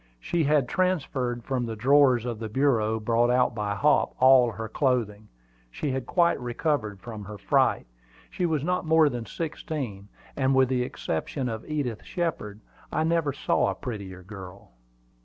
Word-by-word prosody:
She 165 - 0
had 145 -3 +3
transferred 135 -10 -1
from 125 -2 -2
the 115 - -4
drawers 130 0 +4
of 120 -3 -4
the 110 -1 -5
bureau 110 -3 +1
brought 115 +2 +2
out 125 0 +3
by 105 -2 -2
Hop, 100 - +2
all 130 -2 +6
her 115 +1 -5
clothing. 110 -5 -1 0.4
She 140 - -3
had 130 -1 -3
quite 170 -4 +2
recovered 120 -4 -2
from 105 +1 -8
her 105 +1 -8
fright. 100 - +2 0.5
She 180 - -1
was 155 -4 -1
not 180 +2 0
more 160 -2 +4
than 120 -3 -5
sixteen, 145 - -5 0.3
and 135 -1 +2
with 130 -1 +4
the 130 -1 +1
exception 125 - -3
of 110 +4 -6
Edith 135 -8 -2
Shepard, 130 - -4 0.3
I 155 - 0
never 165 -2 +1
saw 140 - +1
a - - -3
prettier 100 -7 -7
girl. 95 - -11
125 Hz, 165 wpm, -26 LUFS, 110-145 Hz, 0.5 s, all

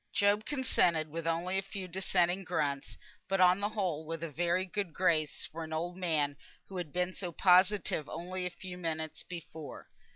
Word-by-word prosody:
Job 205 +1 +3
consented 180 - +2
with 165 +2 -4
only 175 +3 +1
a - - 0
few 195 -1 -5
dissenting 180 0 +1
grunts; 145 -5 -2 0.3
but 195 0 +1
on 180 +1 +6
the 205 +1 0
whole, 185 -8 -1
with 165 +1 -4
a 165 - -4
very 175 +4 +1
good 190 -2 -3
grace 160 -5 +2
for 165 +1 -5
an 160 - -8
old 170 +3 -2
man 155 -6 +1 0.3
who 190 - -6
had 175 -5 -4
been 180 +2 0
so 180 -2 -3
positive 185 -2 +4
only 180 +3 -4
a 180 - -1
few 180 0 -8
minutes 160 -2 -3
before. 160 -3 -8
175 Hz, 185 wpm, -32 LUFS, 160-185 Hz, 0.3 s, on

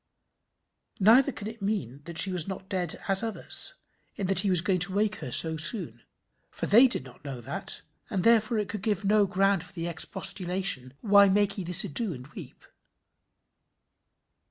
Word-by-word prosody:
Neither 240 +8 +5
can 210 -4 -8
it 225 0 -9
mean, 145 - -3
that 170 -1 -8
she 190 - +5
was 180 -2 -2
not 190 0 -7
dead 180 -4 -3
as 195 -1 +2
others, 225 - -1 0.4
in 200 - -4
that 190 0 +1
he 200 +1 +1
was 180 -3 +3
going 185 +1 0
to 175 +3 0
wake 210 +1 0
her 125 - -7
so 160 +5 +7
soon; 180 +7 -2 0.5
for - - -5
they 240 +6 +6
did 235 - -3
not 130 +1 -16
know 135 -4 -7
that, 120 - -5 0.3
and 190 -3 -2
therefore 230 0 +3
it 210 -2 -2
could 205 +1 -6
give 205 -1 -2
no 205 0 +3
ground 195 -1 +1
for 180 - -15
the 170 -2 -4
expostulation, 180 -4 -2
"Why 200 -2 +5
make 200 +1 +1
ye - - -4
this 175 0 +4
ado, 205 +5 -3
and 125 -2 -10
weep?" - - -12
195 Hz, 180 wpm, -27 LUFS, 170-210 Hz, 0.5 s, so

